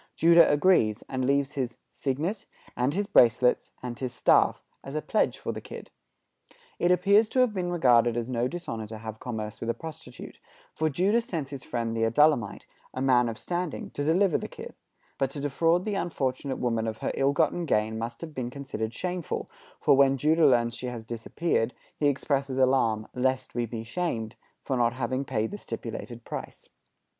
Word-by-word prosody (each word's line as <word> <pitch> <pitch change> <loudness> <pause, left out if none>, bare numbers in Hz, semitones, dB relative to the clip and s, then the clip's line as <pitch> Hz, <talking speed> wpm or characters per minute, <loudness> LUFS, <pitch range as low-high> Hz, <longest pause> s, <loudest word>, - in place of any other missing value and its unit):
Judah 170 -1 +6
agrees, 145 - +3
and 130 -1 -2
leaves 140 +1 +1
his 130 -4 -3
"signet, 155 +10 -3 0.3
and 130 +5 0
his 205 +1 0
bracelets, 125 - +4
and 120 -1 -5
his 130 -2 -3
staff" 115 - +3 0.2
as 135 - -7
a 155 - 0
pledge - - +1
for - - -4
the - - -6
kid. - - -10 0.9
It 175 - +2
appears 200 +5 +4
to 260 - 0
have 250 -4 +2
been 180 -3 -2
regarded 120 -8 +4
as 120 -1 -2
no 125 -1 0
dishonor 150 -9 -5
to 110 +1 -7
have 110 0 -8
commerce 110 -3 -5
with 115 - -3
a 115 - 0
prostitute, 160 -6 -10 0.3
for 155 0 0
Judah 195 - +2
sends 160 - -4
his 140 -2 -7
friend 115 -2 -3
the 115 - -1
Adullamite, 120 -1 +2 0.3
a - - -3
man 125 -2 +3
of 110 - -6
standing, 175 -2 -4
to 145 - -3
deliver 175 +4 +3
the - - -5
kid; - - -10 0.5
but 135 - +1
to 140 - -7
defraud 165 +5 +1
the 215 - -1
unfortunate 135 -7 -2
woman 115 -2 -1
of 110 0 -3
her - - -2
ill 135 +1 +2
gotten 160 +3 +1
gain 110 -1 +1
must 115 +1 -5
have 160 -2 -7
been 125 -4 -3
considered 125 -5 -5
shameful, 180 +1 -4 0.3
for, - - +4
when 135 0 +4
Judah 155 +3 +4
learns 120 -3 +3
that - - -7
she 125 - -4
has 120 -2 -6
disappeared, 115 +2 -1 0.2
he 145 - +1
expresses 140 -1 0
alarm 125 -5 +2
"lest 130 +1 -1
we 120 -1 -1
be 110 0 -5
shamed" 115 -5 -3 0.3
for 135 - -1
not 120 -1 +2
having 130 +1 -2
paid 110 -4 -2
the 205 - -6
stipulated 115 - -6
price. - - -7
130 Hz, 190 wpm, -27 LUFS, 115-160 Hz, 0.9 s, Judah